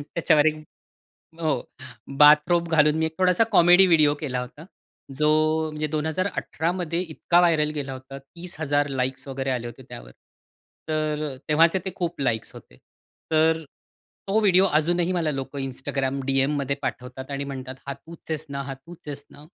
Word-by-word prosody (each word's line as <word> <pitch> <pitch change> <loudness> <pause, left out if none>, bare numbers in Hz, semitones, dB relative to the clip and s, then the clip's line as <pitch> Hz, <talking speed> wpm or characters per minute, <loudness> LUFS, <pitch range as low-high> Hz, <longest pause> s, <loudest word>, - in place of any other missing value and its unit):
त्याच्यावर 155 -2 +3
एक 155 0 -1 0.8
हो. 150 -6 0 0.6
बाथरोब 155 +4 +6
घालून 150 -1 +4
मी 160 - +1
एक 160 - -5
थोडासा 185 +4 +4
कॉमेडी 180 +2 +6
व्हिडिओ 155 -4 +4
केला 130 -5 -3
होता. 140 +6 -10 0.5
जो 150 - +3 0.4
म्हणजे 155 0 -3
2018 160 +2 -2
मध्ये 175 -2 -3
इतका 170 0 +1
व्हायरल 160 -4 +3
गेला 140 -2 -4
होता. 130 +1 -10
30,000 145 -1 -3
लाइक्स 130 0 -3
वगैरे 135 0 -3
आले 120 -2 -2
होते 120 - -11
त्यावर. - - -10 0.8
तर 155 -2 -1
तेव्हाचे 165 +4 +4
ते 190 - -3
खूप 170 -5 -3
लाईक्स 110 -4 -1
होते. - - -15 0.5
तर 160 +1 +3 0.6
तो 200 +3 +2
व्हिडिओ 190 -2 +5
अजूनही 175 +3 0
मला 165 -4 0
लोकं 135 +1 -5
Instagram 135 +1 -3
डीएममध्ये 140 +1 +1
पाठवतात 130 +2 -6
आणि 140 0 -3
म्हणतात, 130 -2 -7
"हा 140 - -2
तूच 165 +4 -14
आहेस 155 0 -3
ना, 140 0 -4
हा 135 0 -6
तूच 155 +4 -16
आहेस 145 0 -6
ना." 145 +1 -15
150 Hz, 155 wpm, -24 LUFS, 135-165 Hz, 0.8 s, बाथरोब